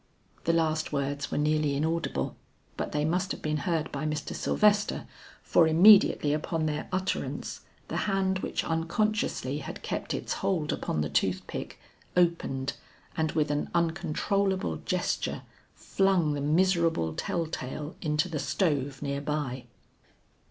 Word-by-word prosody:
The 165 - +4
last 160 -1 +1
words 140 0 -2
were - - -2
nearly 150 -1 +2
inaudible 160 +3 -1 0.4
but - - -3
they 150 0 0
must 180 +4 0
have - - -9
been 155 0 0
heard 165 -2 0
by 140 +1 -4
Mr. 150 -1 -3
Sylvester, 210 -1 +2 0.4
for 165 - +4
immediately 170 -3 +6
upon 155 +1 -1
their 150 -1 -2
utterance, 185 +1 -2 0.3
the - - -3
hand 190 -1 +1
which - - -2
unconsciously 165 -4 0
had 140 - -7
kept - - -3
its - - -3
hold 165 -6 0
upon 75 - -2
the 75 - -1
tooth - - +1
pick, - - -6 0.4
opened 165 -6 +1 0.4
and 160 -1 0
with 150 -2 +1
an 145 0 -1
uncontrollable 175 - 0
gesture - - -2 0.3
flung 190 -6 +2
the 145 - -2
miserable 165 - +2
tell 165 - -1
tale 150 0 -5
into 150 +1 +1
the 160 -4 -3
stove 145 -7 0
near 140 0 -2
by. 140 -4 -3
155 Hz, 140 wpm, -28 LUFS, 145-175 Hz, 0.4 s, immediately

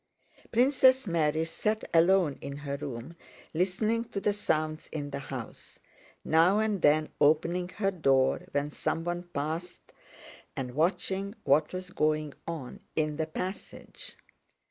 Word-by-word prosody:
Princess 260 +1 +5
Mary 160 -3 +1
sat 215 +6 -1
alone 170 -2 +4
in 140 0 -6
her 140 -1 -4
room 140 +2 -6 0.4
listening 205 +7 +1
to 215 -4 -5
the 205 +1 +1
sounds 155 -5 -1
in 145 -2 -4
the 140 - -3
house, 130 -4 -8 0.5
now 165 +5 +4
and 215 -3 0
then 155 +1 +4
opening 170 +4 +3
her 195 +1 -1
door 135 -7 +2
when 145 +1 -1
someone 175 +3 -2
passed 160 +4 -4 0.6
and 125 -2 -4
watching 190 - 0
what 150 0 +3
was 185 0 -6
going 155 -3 0
on 160 -7 -5 0.2
in 155 -1 0
the 160 -1 -1
passage. 185 +4 -7
165 Hz, 130 wpm, -29 LUFS, 150-190 Hz, 0.6 s, Princess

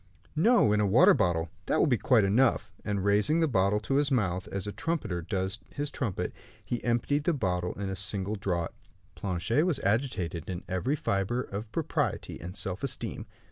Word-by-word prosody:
"No, 165 - +4
in 105 - +2
a 105 - +3
water 95 - +7
bottle; 85 -1 +1 0.2
that - - +2
will - - +4
be 135 -6 +3
quite 120 -5 +4
enough;" 115 +6 +2
and 100 -2 -2
raising 105 +11 +3
the 165 - +3
bottle 100 -4 +2
to 135 +5 0
his 145 -1 +2
mouth, 95 -8 0
as 100 -1 -3
a 105 - -3
trumpeter 135 - -2
does 95 +4 -2
his 145 0 -4
trumpet, 110 -9 -3 0.3
he 120 - -3
emptied 125 +5 +1
the 175 - +3
bottle 90 - -1
at 100 - -2
a 95 - -3
single 100 +1 0
draught. 90 -4 -2 0.4
Planchet 100 - 0
was 175 -6 +1
agitated 100 - -1
in 90 -1 -4
every 95 +10 0
fibre 110 -2 0
of 105 +2 -6
propriety - - -2
and 90 +2 -7
self 95 -1 -2
esteem. 140 - -3
105 Hz, 185 wpm, -29 LUFS, 95-130 Hz, 0.4 s, water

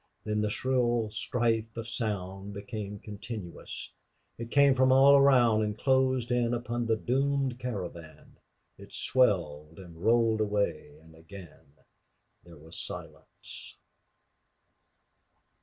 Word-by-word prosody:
Then 105 0 -1
the 105 - 0
shrill 120 -2 0
strife 115 -1 -1
of 115 0 -5
sound 100 -4 -4
became 105 0 -6
continuous; 105 -4 -8 0.4
it 115 0 -7
came 140 +1 +5
from 130 0 +3
all 135 +2 +7
around 125 -6 +5
and 105 0 -2
closed 130 -2 +1
in 120 -1 +1
upon 120 0 -3
the 115 - +3
doomed 135 +2 0
caravan. 85 - -7 0.4
It - - -13
swelled 80 - 0
and 85 -3 -12
rolled 115 -1 +3
away 100 -8 -2
and 80 0 -18
again 80 -3 -14 0.7
there 85 -2 -15
was 80 +3 -9
silence. - - -9
110 Hz, 115 wpm, -29 LUFS, 95-125 Hz, 0.7 s, all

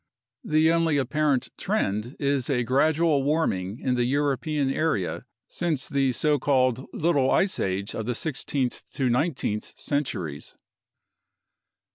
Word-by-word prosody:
The 155 +1 +3
only 165 -3 +2
apparent 140 0 +1
trend 105 +6 -1
is 140 -2 0
a 125 -3 +1
gradual 150 +4 +2
warming 120 - 0
in 130 - 0
the 120 -1 +1
European 140 +1 0
area 135 - -1 0.2
since 165 -6 -1
the 135 -2 +1
so 150 +3 +1
called 130 -2 +1
Little 145 -5 +1
Ice 190 0 +2
Age 95 +2 -2
of 110 - -4
the 125 - -1
sixteenth 135 -3 -2
to 130 -2 0
nineteenth 125 -6 -1
centuries. 90 - -3
140 Hz, 125 wpm, -26 LUFS, 125-155 Hz, 0.2 s, The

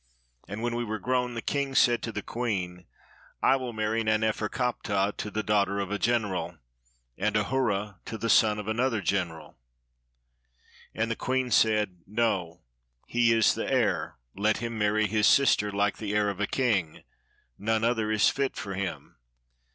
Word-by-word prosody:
And 105 +3 -6
when 120 0 -1
we 120 - -1
were 110 -1 -3
grown, 125 +3 -1
the 115 - -4
king 140 -1 -2
said 120 -3 +4
to 115 - -4
the - - -5
queen, 90 -7 -3 0.3
" - - -26
I - - +5
will 130 -2 -3
marry 110 +1 -1
Nanef 110 0 +1
erkaptah 105 -4 -1
to 105 - -5
the 110 +1 -3
daughter 100 -1 +1
of 100 0 -3
a 105 - -1
gen 120 -1 +2
eral, 95 -3 -4 0.6
and 105 +2 +1
Ahura 105 -4 -1
to 110 - -5
the 115 - -3
son 110 -2 +4
of 105 -1 -6
another 115 +1 0
general." 85 -6 -3 1.4
And 115 +1 -1
the - - 0
queen 130 0 -1
said, 105 -5 +2
"No, 95 -6 -1 0.4
he 120 -1 +2
is 115 -2 +4
the - - -3
heir, - - +1 0.2
let 105 +2 +1
him 115 +1 -4
marry 105 0 +2
his 105 +1 +2
sister, 105 -7 +4
like 100 0 0
the 105 -1 -3
heir 105 -1 +2
of 100 - -10
a 105 - 0
king, 105 -12 0 0.6
none 110 +1 0
other 115 -2 +1
is 110 - +4
fit 140 -1 0
for 100 -2 -5
him." 95 -1 -5
110 Hz, 175 wpm, -27 LUFS, 100-115 Hz, 1.4 s, I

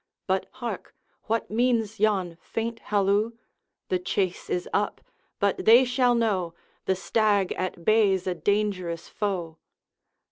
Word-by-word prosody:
But 190 0 0
hark! 240 -6 -6 0.3
what 225 -1 -1
means 225 -2 +1
yon 195 -5 +1
faint 230 0 -4
halloo? 205 +2 +1 0.6
The 185 - +1
chase 180 0 -2
is 180 0 -1
up, 205 - 0 0.4
but 200 -1 +1
they 235 +4 +8
shall 250 -1 +2
know, 190 -8 0 0.3
The 190 - +2
stag 205 0 +1
at 180 -2 -4
bay 215 -3 +4
's 185 - -12
a 185 - 0
dangerous 185 -3 -1
foe.' 180 -6 -3
205 Hz, 135 wpm, -26 LUFS, 185-225 Hz, 0.6 s, they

